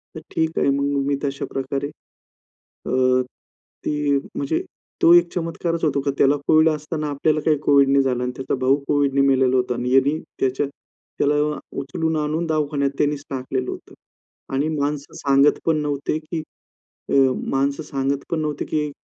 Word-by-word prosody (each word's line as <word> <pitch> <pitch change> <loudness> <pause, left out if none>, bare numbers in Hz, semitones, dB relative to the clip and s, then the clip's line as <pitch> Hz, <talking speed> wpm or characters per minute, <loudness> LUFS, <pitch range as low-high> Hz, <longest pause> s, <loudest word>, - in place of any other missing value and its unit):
तर - - -5 0.2
ठीक 160 0 0
आहे - - +2
मग. 140 0 +1 0.2
मी 145 - +2
तशा 140 -1 -2
प्रकारे 135 +1 -2 1.0
अ, 130 0 +3 0.6
ती 150 -1 +1 0.2
म्हणजे 140 +3 -1 0.4
तो 170 - +7
एक 175 0 +5
चमत्कारच 165 0 -2
होतो 145 -3 +1
की 140 +1 0
त्याला 140 +1 +4
कोविड 155 0 +5
असताना 155 0 -3
आपल्याला 150 +2 +1
काही 155 -2 +3
कोविड 140 -1 +5
नाही 140 0 +4
झालं 125 -2 0
आणि 125 - -1
त्याचा 130 - -2
भाऊ 130 +1 +4
कोविडने 140 -1 +2
मेलेला 130 -2 +3
होता 125 0 0
आणि 125 +1 -2
यांनी 135 +3 +4 0.2
त्याच्या 135 +2 +1
त्याला 145 +1 -4 0.4
उचलून 160 +4 -2
आणून 155 +2 -1
दवाखान्यात 150 -3 0
त्यानीच 145 -1 0
टाकलेलं 130 -1 -3
होते. - - -10 0.6
आणि 140 +3 +1
माणसं 145 0 -2
सांगत 140 -1 +3
पण 160 -1 +2
नव्हते 145 0 -1
की 160 +1 -5 0.7
अ, - - +1 0.3
माणसं 140 +3 0
सांगत 140 -1 -2
पण 165 - 0
नव्हते 150 -2 -2
की 150 -1 -1
140 Hz, 160 wpm, -22 LUFS, 135-155 Hz, 1.0 s, तो